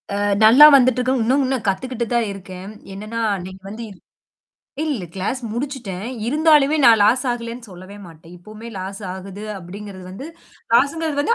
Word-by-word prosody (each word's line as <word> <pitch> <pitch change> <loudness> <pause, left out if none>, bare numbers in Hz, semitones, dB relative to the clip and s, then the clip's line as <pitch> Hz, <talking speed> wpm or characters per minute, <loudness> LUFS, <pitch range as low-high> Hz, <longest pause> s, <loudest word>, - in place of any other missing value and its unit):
ஆ, - - -1 0.3
நல்லா 245 +7 +9
வந்துட்டுருக்கு. 255 -1 +3
இன்னும் 265 +5 +2
இன்னும் 255 -3 -2
கத்துக்கிட்டு 240 +4 -2
தான் 235 -2 +1
இருக்கேன். 190 -1 -9 0.2
என்னன்னா, 215 +4 -6 0.2
இன்னைக்கு 185 +1 -10
வந்திர் 215 -2 -9 0.9
இல்ல 280 - -3
கிளாஸ் 195 +7 -3
முடிச்சிட்டேன். 240 -7 -5 0.2
இருந்தாலுமே 300 +1 +4
நான் 230 -3 +7
லாஸ் 235 +6 +3
ஆகலேன்னு 235 -1 -6
சொல்லவே 185 +2 -12
மாட்டேன். 165 0 -15
இப்பவுமே 215 +5 -11
லாஸ் 190 +2 -6
ஆகுது 195 +2 -9 0.2
அப்பிடிங்கிறது 190 +1 -10
வந்து. 200 +10 -8 0.5
லாஸ்ங்கிறது 290 +3 +1
வந்து 465 - +2
225 Hz, 145 wpm, -20 LUFS, 190-260 Hz, 0.9 s, நல்லா